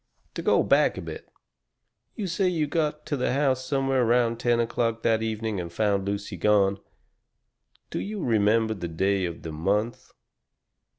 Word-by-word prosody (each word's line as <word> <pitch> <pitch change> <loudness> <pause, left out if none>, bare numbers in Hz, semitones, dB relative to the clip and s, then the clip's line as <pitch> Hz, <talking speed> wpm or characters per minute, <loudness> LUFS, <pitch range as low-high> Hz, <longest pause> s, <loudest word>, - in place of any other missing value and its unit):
"To - - -4
go - - +3
back - - +3
a - - -4
bit. - - -8 0.9
You 210 - -3
say 185 +2 0
you 165 -4 +1
got 150 0 -1
to 145 - -2
the 125 -2 0
house 135 -2 +1
somewhere 135 -1 +1
around 120 -1 +2
ten 120 -1 +2
o'clock 115 -1 -1
that 110 -1 +2
evening 110 -2 -2
and 85 -1 -7
found 100 0 0
Lucy 100 -1 -3
gone. 100 +1 +3 1.1
Do - - -2
you 210 +1 -4
remember 110 0 +2
the 90 -5 -5
day 95 +3 0
of 85 -1 -6
the 80 - -5
month?" 100 +9 -1
115 Hz, 165 wpm, -26 LUFS, 100-130 Hz, 1.1 s, go